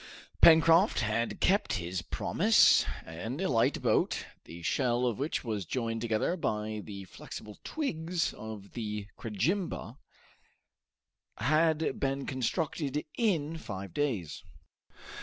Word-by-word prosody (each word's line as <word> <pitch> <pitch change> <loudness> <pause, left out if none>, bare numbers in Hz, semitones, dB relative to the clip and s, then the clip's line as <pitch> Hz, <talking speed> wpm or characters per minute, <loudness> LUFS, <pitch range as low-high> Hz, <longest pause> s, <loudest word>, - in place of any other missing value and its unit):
Pencroft 165 - +6
had 115 +1 -1
kept 200 +3 +2
his 90 0 -2
promise, 210 - +4 0.2
and 110 - -5
a 190 - 0
light 115 -3 +2
boat, - - +1 0.2
the 85 +1 -10
shell 125 - +1
of 120 -2 -1
which 145 +4 -1
was 110 -5 -2
joined 115 +4 -2
together 115 +8 0
by 110 - -2
the 100 -2 -8
flexible 105 +3 -10
twigs 175 - -2
of 110 -2 -9
the 105 -3 -4
crejimba, 125 - -2 1.4
had 155 +4 +2
been 135 0 -1
constructed 145 +2 -2
in 165 -9 0
five 100 - -7
days. 110 - -2
125 Hz, 115 wpm, -30 LUFS, 105-160 Hz, 1.4 s, Pencroft